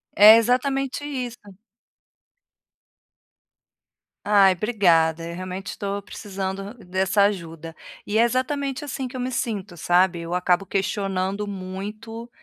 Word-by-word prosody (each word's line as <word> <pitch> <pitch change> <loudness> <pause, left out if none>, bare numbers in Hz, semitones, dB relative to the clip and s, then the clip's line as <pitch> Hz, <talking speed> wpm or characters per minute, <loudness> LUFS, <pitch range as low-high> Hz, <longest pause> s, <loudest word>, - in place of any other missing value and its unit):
É 210 +2 +10
exatamente 270 +4 0
isso. 250 -4 -4 2.9
Ai, 200 -2 +5
obrigada, 170 -6 +2
eu 170 - -6
realmente 185 +2 -6
estou 200 0 -4
precisando 195 0 -6
dessa 190 -1 +1
ajuda. 165 -5 -3 0.3
E 215 +2 0
é - - +6
exatamente 270 +4 -1
assim, 265 -1 -4
que 250 - -11
eu 255 - -4
me 255 +1 -2
sinto, 210 -7 -3
sabe, 175 +1 +2
eu 170 +1 -4
acabo 180 +1 +2
questionando 195 0 -2
muito, 205 +4 -7
200 Hz, 115 wpm, -23 LUFS, 185-235 Hz, 2.9 s, É